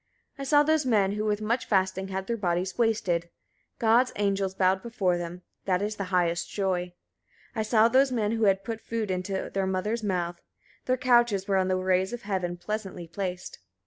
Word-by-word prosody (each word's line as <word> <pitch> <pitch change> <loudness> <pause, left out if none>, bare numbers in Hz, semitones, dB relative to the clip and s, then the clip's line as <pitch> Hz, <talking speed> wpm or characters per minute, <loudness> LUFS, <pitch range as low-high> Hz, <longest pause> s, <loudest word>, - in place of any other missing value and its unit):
71. - - -8
I 270 - -5
saw 290 -1 +6
those 315 0 +2
men 205 -5 +3
who 210 +1 -2
with 210 0 0
much 235 +3 -1
fasting 190 -1 +1
had 190 0 -4
their 235 - -1
bodies 185 -2 -1
wasted: 190 -8 0 0.5
God's 235 +3 +3
angels 195 -2 0
bowed 190 0 +2
before 205 -7 0
them: 175 +1 -6 0.2
that 185 0 +1
is 210 +1 -3
the 200 - -3
highest 175 -2 0
joy. 185 -3 -1 0.6
72. 225 - -5
I - - +3
saw 215 +1 +4
those 265 +3 +4
men 220 -4 0
who 225 -1 +1
had 195 -1 +3
put 225 0 -5
food 225 -4 -3
into 185 +1 -3
their 195 -1 0
mothers' 210 +5 -1
mouth: 175 -4 -2 0.4
their 255 0 +1
couches 240 -6 +3
were 195 -1 +2
on 185 -1 +2
the 185 - +1
rays 185 +2 +1
of 240 - -6
heaven 185 -3 -2
pleasantly 190 -2 -5
placed. 180 0 -5
195 Hz, 200 wpm, -27 LUFS, 185-225 Hz, 0.6 s, saw